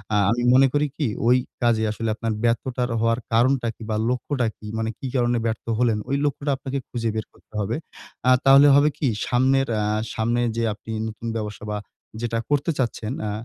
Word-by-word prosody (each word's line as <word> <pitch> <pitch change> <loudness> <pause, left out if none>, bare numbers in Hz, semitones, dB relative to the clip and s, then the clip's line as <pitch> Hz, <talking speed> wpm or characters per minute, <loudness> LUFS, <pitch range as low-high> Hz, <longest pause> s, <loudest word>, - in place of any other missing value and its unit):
আ - - +4
আমি 120 +1 0
মনে 135 +1 +6
করি 145 0 +2
কি? 145 - 0 0.2
ওই 125 +1 +6 0.3
কাজে 115 -2 +3
আসলে 115 +1 -3
আপনার 115 -1 -2
ব্যর্থতার 125 +2 0
হওয়ার 115 +1 +2
কারণটা 120 +1 +3
কি - - -22
বা 110 - 0
লক্ষ্যটা 125 0 -1
কি? - - -13
মানে 110 0 -1
কী 135 - -4
কারণে 120 -1 +2
ব্যর্থ 110 -1 -2
হলেন? 120 -3 +2
ওই 135 - +1
লক্ষ্যটা 145 0 -1
আপনাকে 135 0 -4
খুঁজে 115 -2 -2
বের 110 - -2
করতে - - -27
হবে। 105 +4 -1 0.5
আ - - +7
তাহলে 135 +2 +8
হবে 145 +1 +5
কি? 145 - 0 0.2
সামনের 135 +2 +2
অ্যা 105 -1 0 0.3
সামনে 120 +1 +1 0.2
যে 115 - +1
আপনি 110 +1 -10 0.2
নতুন 110 +1 -7
ব্যবসা 105 -2 -5
বা 105 - -1 0.4
যেটা 115 -1 -1
করতে 145 +3 +1
চাচ্ছেন 115 -2 -2
আ - - -2
120 Hz, 195 wpm, -23 LUFS, 115-135 Hz, 0.5 s, তাহলে